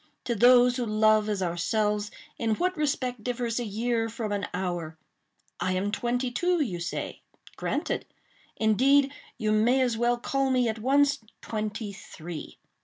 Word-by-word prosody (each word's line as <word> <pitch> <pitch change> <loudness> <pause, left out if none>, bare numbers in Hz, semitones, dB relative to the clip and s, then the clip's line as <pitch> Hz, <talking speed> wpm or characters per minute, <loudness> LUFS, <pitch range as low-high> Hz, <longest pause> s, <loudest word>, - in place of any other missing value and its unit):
To 240 - -1
those 245 +2 +6
who 245 - -1
love 215 0 +3
as 200 -3 -1
ourselves, 210 +4 0 0.3
in 225 -2 +1
what 365 +6 0
respect 260 -7 -1
differs 240 -1 -2
a 240 - -2
year 225 +2 -1
from 220 -1 -4
an 205 -1 -1
hour? 175 -3 -3 0.6
I 185 - 0
am 195 +2 -1
twenty 245 +3 -1
two, 350 +7 +1
you 195 - -1
say; 170 +1 -4 0.3
granted: - - -2 0.5
indeed, 270 +6 +4 0.2
you 215 -3 0
may 230 +5 +3
as 245 -3 +1
well 240 +1 +2
call 270 +2 0
me, 250 -2 +2
at 220 0 -2
once, 280 +4 +3 0.2
twenty 215 -1 -4
three. 170 -4 -9
225 Hz, 155 wpm, -27 LUFS, 210-250 Hz, 0.6 s, those